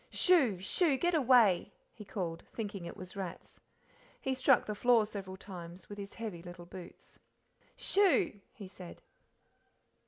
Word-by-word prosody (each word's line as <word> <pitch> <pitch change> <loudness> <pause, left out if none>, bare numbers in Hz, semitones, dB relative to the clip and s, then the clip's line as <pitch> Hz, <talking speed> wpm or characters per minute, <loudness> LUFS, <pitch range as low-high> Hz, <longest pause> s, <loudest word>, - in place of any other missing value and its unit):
"Shoo 280 - +4
shoo, 275 - +2
get 350 +5 +1
away!" 245 - +4 0.2
he 215 - -10
called, 175 -5 -4
thinking 205 -5 -5
it - - -8
was 185 +2 -9
rats. 190 -3 -7 0.6
He 265 - -1
struck 260 0 +4
the 210 - -3
floor 230 0 +4
several 195 -3 -7
times 180 -2 -10
with 205 0 -8
his 200 0 -8
heavy 215 -7 -5
little 175 0 -10
boots. 180 0 -12 0.6
"Shoo!" 375 - +2
he 200 -3 -10
said. 185 -2 -11
205 Hz, 145 wpm, -33 LUFS, 185-245 Hz, 0.6 s, Shoo